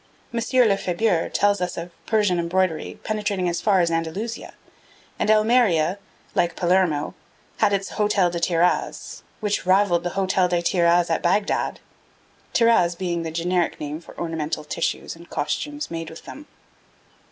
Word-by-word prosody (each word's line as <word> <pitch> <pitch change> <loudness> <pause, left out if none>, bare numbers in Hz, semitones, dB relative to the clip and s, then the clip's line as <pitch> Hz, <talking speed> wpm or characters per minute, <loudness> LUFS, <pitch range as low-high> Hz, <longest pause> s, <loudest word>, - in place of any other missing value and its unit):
M. 235 - 0 0.3
Lefebure 190 -2 +1
tells 205 -1 +2
us 180 0 -2
of 170 +1 -6 0.2
Persian 205 -5 +2
embroidery 170 -1 -1
penetrating 210 -4 -1
as 175 0 -1
far 195 -4 +3
as 170 -1 +1
Andalusia; 165 +8 -3 0.6
and - - 0
Almeria, 215 -6 +3 0.3
like 170 0 +1
Palermo, 175 -4 +1 0.4
had - - +3
its 195 -1 -1
Hotel 205 -4 +1
des 170 - -3
Tiraz, 170 +1 0 0.2
which 205 -3 -1
rivalled 185 -2 +4
the 175 +2 -5
Hotel 185 -1 +2
des 175 -1 0
Tiraz 170 -1 +3
at 165 - +1
Bagdad, 195 +4 0 0.7
tiraz 225 -8 +3
being 175 -2 -2
the 165 - -4
generic 170 +2 -1
name 150 +2 -5
for - - -15
ornamental 160 -2 -3
tissues 165 +2 -3
and 170 +1 -15
costumes 295 - -3
made 165 -1 -4
with 160 - -11
them. 295 +1 -10
180 Hz, 145 wpm, -23 LUFS, 170-205 Hz, 0.7 s, rivalled